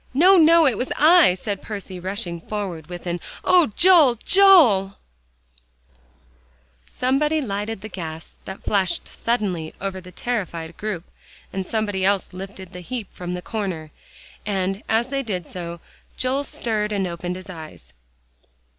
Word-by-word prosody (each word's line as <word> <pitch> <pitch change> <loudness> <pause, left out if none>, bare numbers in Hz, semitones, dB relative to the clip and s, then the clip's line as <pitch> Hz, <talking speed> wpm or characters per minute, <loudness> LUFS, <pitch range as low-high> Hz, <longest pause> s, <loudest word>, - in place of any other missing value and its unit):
"No, 365 +7 +7
no, 330 -1 +6
it 255 -7 +2
was 255 - -2
I," 315 - +6
and 205 -3 -2
Percy 200 -3 -7
rushed 190 +3 -3 0.2
forward 185 -7 -4
with 175 0 -8
an 175 0 -2 0.3
"Oh, 360 -3 +5
Joel, 340 -9 +6
Joel!" 250 - +5 1.9
Somebody 295 +5 +1
lighted 210 -4 -3
the 215 - -6
gas, 165 -5 -8
that 190 - -8
flashed 195 -3 0
suddenly 190 -9 -2
over 190 -1 -4
the 180 0 -13
terrified 170 -7 -4
group, 205 -6 -4 0.5
and 190 -1 -3
somebody 205 -4 -1
else 195 -1 +1
lifted 190 0 -9
the 180 - -8
heap 220 +2 -6
from 180 0 -5
the 180 - -7
corner. 180 -7 -4 0.5
And 195 -1 -2
as 230 +3 +1
they 275 0 -1
did 190 -9 -4
so, 170 0 -7 0.4
Joel 265 +2 0
stirred 215 -5 -2
and 200 -2 0
opened 175 0 -4
his 185 0 -10
eyes. 160 -4 -11
200 Hz, 145 wpm, -22 LUFS, 180-245 Hz, 1.9 s, No